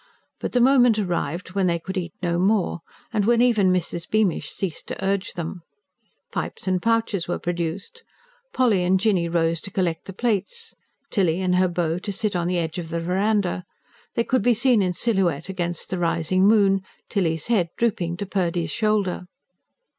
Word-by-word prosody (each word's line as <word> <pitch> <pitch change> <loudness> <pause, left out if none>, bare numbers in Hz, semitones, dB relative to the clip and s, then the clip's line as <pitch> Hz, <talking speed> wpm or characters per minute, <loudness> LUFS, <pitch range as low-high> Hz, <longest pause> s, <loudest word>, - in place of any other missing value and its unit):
But - - -4
the 250 - +3
moment 245 -3 +5
arrived 175 -2 -2
when 195 -1 +1
they 170 -1 +2
could 190 +4 -7
eat 175 -3 -4
no 170 -1 +1
more, 195 -2 +1 0.3
and 210 -2 +2
when 235 +1 +4
even 220 -6 +4
Mrs. 170 -1 -2
Beamish 215 -5 +1
ceased 185 -5 -4
to 190 - -4
urge 195 0 -1
them. 170 0 -5 0.7
Pipes - - -4
and 185 -1 +1
pouches 225 -5 0
were 175 - -1
produced; 175 - -4 0.5
Polly 225 -8 +2
and 185 +1 +3
Jinny 185 -5 +2
rose 165 -1 +1
to - - -8
collect 180 -4 -1
the - - -6
plates, 240 - -2 0.4
Tilly 180 -5 +2
and 185 -1 +1
her 185 0 +4
beau 170 -1 -1
to 200 - -4
sit 205 0 -1
on 175 -1 0
the 180 0 0
edge 165 +1 -2
of 165 -2 -6
the 170 0 -2
verandah: 185 +1 0 0.5
they 235 - +2
could 255 +1 +1
be 245 -1 +3
seen 245 -1 +3
in 180 -2 +1
silhouette 190 -6 0
against 175 -3 -4
the 185 - -1
rising 175 +3 +2
moon, 200 -3 +4 0.3
Tilly's 165 -6 0
head 200 -8 +2
drooping 175 -7 0
to 200 - -3
Purdy's 175 -3 -1
shoulder. 210 -5 0
185 Hz, 180 wpm, -23 LUFS, 175-215 Hz, 0.7 s, moment